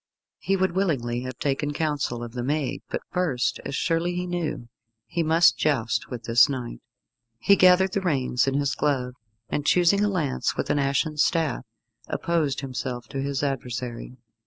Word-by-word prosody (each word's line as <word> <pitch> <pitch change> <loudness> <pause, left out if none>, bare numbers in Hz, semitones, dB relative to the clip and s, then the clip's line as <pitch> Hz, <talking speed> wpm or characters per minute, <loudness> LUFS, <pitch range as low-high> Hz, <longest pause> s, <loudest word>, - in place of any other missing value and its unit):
He 195 - 0
would 190 -1 +1
willingly 135 -11 0
have 130 0 -6
taken 145 +1 -1
counsel 145 -6 -2
of 120 - -7
the 125 +1 -4
maiden, 145 +2 -1
but - - -3
first, 150 -10 0
as 140 - -4
surely 170 +3 0
he 180 0 -2
knew, 175 -8 -3 0.4
he 170 - -2
must 165 +2 +4
joust 130 -7 0
with 120 -3 -6
this 115 +2 +5
knight. 125 - -5 0.6
He 200 +12 +4
gathered 185 0 +5
the 200 - -1
reins 135 -8 +1
in 135 - +1
his 140 -1 +1
glove, 130 -4 0 0.3
and 145 - -2
choosing 180 +6 +4
a 210 - +2
lance 155 -9 -1
with - - -1
an 145 - +1
ashen 140 +2 0
staff, 150 -5 +1 0.4
opposed 160 -6 -1
himself 125 -3 -5
to 135 - -3
his 140 0 -2
adversary. 125 -2 -4
140 Hz, 170 wpm, -25 LUFS, 125-170 Hz, 0.6 s, this